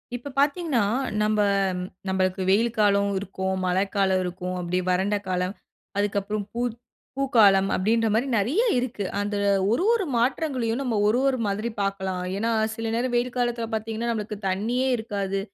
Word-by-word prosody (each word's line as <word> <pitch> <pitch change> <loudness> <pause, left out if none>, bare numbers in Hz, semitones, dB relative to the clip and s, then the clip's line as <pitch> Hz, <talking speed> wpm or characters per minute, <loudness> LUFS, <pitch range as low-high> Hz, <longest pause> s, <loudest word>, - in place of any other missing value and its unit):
இப்ப 260 +4 -7
பார்த்தீங்கனா, 290 -3 +2 0.4
நம்ப 215 0 +1 0.7
நம்பளுக்கு 190 0 0
வெயில் 230 +4 +2
காலம் 200 -1 +3
இருக்கும், 190 0 -3
மழைக்காலம் 190 +1 +1
இருக்கும். 180 0 -4
அப்டியே 180 +1 -1
வறண்ட 190 +3 +1
காலம் 185 +1 -1 0.4
அதுக்கப்புறம் 205 +1 -1
பூ 235 - -2 0.6
பூக்காலம் 210 -8 +5
அப்டின்ற 225 +4 +2
மாரி 235 +5 +1
நெறைய 260 - +2 0.2
இருக்கு. 245 -5 -2 0.2
அந்த 205 0 -2 0.4
ஒரு 245 +10 +1
ஒரு 460 -5 +1
மாற்றங்களையும் 250 -1 0
நம்ம 250 -4 -1
ஒரு 230 +4 +3
ஒரு 265 - +1
மாதிரி 210 +3 -1
பார்க்கலாம். 190 -2 -2
ஏனா, 225 +3 0 0.2
சில 225 0 -3
நேரம் 245 +1 -1
வெயில் 245 +1 0
காலத்தில 240 -1 0
பார்த்தீங்கன்னா, 220 +1 -2
நம்மளுக்கு 210 -1 -4
தண்ணியே 235 +7 0
இருக்காது. 200 -3 -2
215 Hz, 145 wpm, -25 LUFS, 195-240 Hz, 0.7 s, பூக்காலம்